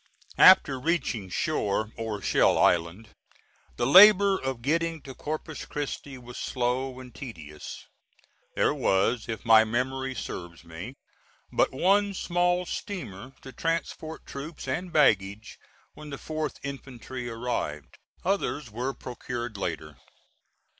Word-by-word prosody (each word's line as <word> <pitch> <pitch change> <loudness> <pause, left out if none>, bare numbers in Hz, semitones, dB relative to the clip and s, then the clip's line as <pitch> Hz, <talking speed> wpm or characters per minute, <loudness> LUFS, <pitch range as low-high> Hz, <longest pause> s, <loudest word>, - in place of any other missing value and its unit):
After 150 -8 +7
reaching 125 - -1
shore, 110 - -1
or 110 -3 -4
Shell - - +3
Island, 90 +6 +2 0.7
the 120 - 0
labor 200 - +8
of 130 -8 -4
getting 165 +3 0
to 135 - -9
Corpus 155 +2 -5
Christi 145 -2 -5
was 125 -1 -10
slow 130 +1 -2
and 125 -2 -11
tedious. 80 - -9 0.7
There - - +2
was, 110 +5 +1
if 110 -2 -5
my 110 -1 +7
memory 130 +3 -2
serves 85 -7 -7
me, 85 +10 -8 0.6
but - - +2
one 200 +7 +2
small 175 0 +1
steamer 135 - -6
to 135 - -9
transport 160 0 -3
troops 145 +2 -8
and 175 +7 -3
baggage 105 -8 +2 0.3
when 150 0 -11
the 140 - -6
4th 155 +1 -4
infantry 130 -2 -6
arrived. 115 - -4 0.3
Others 150 - -1
were 125 +5 -3
procured 120 -2 -6
later. 80 -6 -4
130 Hz, 120 wpm, -27 LUFS, 110-155 Hz, 0.7 s, labor